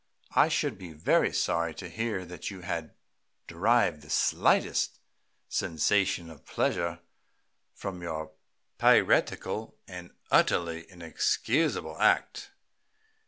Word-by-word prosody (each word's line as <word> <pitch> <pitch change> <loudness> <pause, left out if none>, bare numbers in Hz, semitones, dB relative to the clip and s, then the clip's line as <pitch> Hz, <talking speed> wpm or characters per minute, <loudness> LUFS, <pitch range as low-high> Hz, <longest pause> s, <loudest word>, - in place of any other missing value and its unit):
"I - - +5
should - - -1
be 90 -4 -9
very 75 - +2
sorry 85 -1 0
to 95 - -7
hear 110 0 -3
that 90 0 -7
you 95 -3 -9
had 85 -3 -5 0.5
derived 95 -2 +2
the 75 - -16
slightest - - +2 0.5
sensation 95 +1 0
of 80 - -15
pleasure 85 0 -1 0.7
from 95 -3 -6
your 80 -2 -5 0.5
piratical 110 +1 +2
and 90 -2 -9 0.2
utterly 85 0 +2
inexcusable 90 - -1
act." - - +2
85 Hz, 105 wpm, -29 LUFS, 80-95 Hz, 0.7 s, I